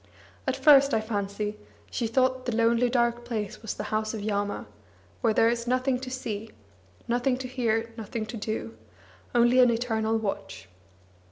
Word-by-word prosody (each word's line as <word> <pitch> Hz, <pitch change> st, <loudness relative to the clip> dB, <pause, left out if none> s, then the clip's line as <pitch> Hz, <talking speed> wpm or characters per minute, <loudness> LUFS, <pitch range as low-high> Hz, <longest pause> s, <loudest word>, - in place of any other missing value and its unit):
At -, -, +1 dB
first, 280 Hz, -2 st, +6 dB
I -, -, +3 dB
fancy, 210 Hz, -1 st, -3 dB, 0.3 s
she 235 Hz, -, -1 dB
thought 255 Hz, +2 st, +1 dB
the 240 Hz, -, 0 dB
lonely 230 Hz, +2 st, +3 dB
dark 240 Hz, -1 st, +1 dB
place 220 Hz, -3 st, -4 dB
was 220 Hz, -, -4 dB
the -, -, -4 dB
House 215 Hz, +1 st, 0 dB
of 215 Hz, -, -5 dB
Yama, 205 Hz, -1 st, -2 dB, 0.6 s
where 225 Hz, -, +3 dB
there 225 Hz, +1 st, +4 dB
is 235 Hz, 0 st, 0 dB
nothing 255 Hz, +1 st, +1 dB
to 260 Hz, 0 st, -6 dB
see, 225 Hz, -4 st, -4 dB, 0.6 s
nothing 245 Hz, +2 st, +1 dB
to 260 Hz, 0 st, -5 dB
hear, 230 Hz, -2 st, -1 dB
nothing 220 Hz, 0 st, -4 dB
to 220 Hz, +2 st, -7 dB
do, 205 Hz, -, -4 dB, 0.6 s
only 240 Hz, +1 st, +5 dB
an 250 Hz, -1 st, +7 dB
eternal 225 Hz, -1 st, 0 dB
watch. 200 Hz, -, -4 dB
230 Hz, 165 wpm, -27 LUFS, 215-250 Hz, 0.6 s, an